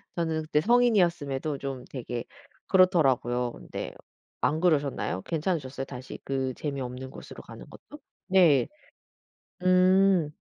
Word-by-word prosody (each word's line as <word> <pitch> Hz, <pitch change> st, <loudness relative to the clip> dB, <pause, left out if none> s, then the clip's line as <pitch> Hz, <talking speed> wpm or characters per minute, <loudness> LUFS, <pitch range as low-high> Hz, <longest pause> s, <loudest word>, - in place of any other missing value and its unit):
저는 160 Hz, -2 st, -1 dB
그때 155 Hz, -1 st, +1 dB
성인이었음에도 175 Hz, -, +2 dB
좀 135 Hz, -2 st, -6 dB
되게 120 Hz, -2 st, -5 dB, 0.4 s
그렇더라고요. 135 Hz, -, +3 dB
근데 -, -, -7 dB, 0.5 s
안 155 Hz, -, +1 dB
그러셨나요? 140 Hz, -, 0 dB
괜찮으셨어요 150 Hz, -5 st, -2 dB
다시 125 Hz, -1 st, -9 dB
그 135 Hz, -1 st, -2 dB
재미없는 130 Hz, -3 st, -5 dB
곳으로 -, -, -11 dB
가는 -, -, -11 dB
것도? 295 Hz, -, -14 dB, 0.3 s
네. 175 Hz, -9 st, +5 dB, 0.9 s
음. 185 Hz, -2 st, +4 dB
150 Hz, 285 characters per minute, -27 LUFS, 130-180 Hz, 0.9 s, 네